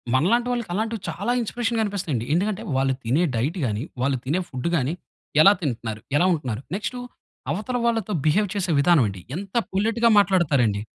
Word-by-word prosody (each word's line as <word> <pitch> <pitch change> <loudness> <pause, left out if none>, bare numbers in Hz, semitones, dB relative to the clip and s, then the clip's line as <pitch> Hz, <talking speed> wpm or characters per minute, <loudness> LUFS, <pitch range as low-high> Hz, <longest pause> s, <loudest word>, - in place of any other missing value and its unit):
మనలాంటి 235 - +2
వాళ్ళకి 240 -6 -2
అలాంటివి 220 +1 -2
చాలా 240 - -2
ఇన్‌స్పిరేషన్‌గా 230 0 -1
అనిపిస్తాయండి. 170 - -2
ఎందుకంటే 200 +4 0 0.2
వాళ్ళు 135 0 +2
తినే 135 +10 +2
డైట్ 145 - -1
గాని, 105 +2 -2 0.2
వాళ్ళు 135 -1 +1
తినే 165 +7 0
ఫుడ్డు 130 +4 -3
గాని 135 +4 0 0.5
ఎలా 200 - +8
తింటున్నారు? 115 -6 -3 0.2
ఎలా 180 - +3
ఉంటున్నారు? 130 -5 -3
నెక్స్టు 245 +4 -4 0.5
అవతల 215 +9 -2
వాళ్ళతో 225 -3 0
బిహేవ్ 200 +6 +3
చేసే 185 -3 -1
విధానమండి. 125 - +3 0.2
ఎంత 195 +3 -8 0.2
పొలెట్‌గా 225 +4 +2
మాట్లాడతారండి. 140 - +2
175 Hz, 155 wpm, -24 LUFS, 130-215 Hz, 0.5 s, ఎలా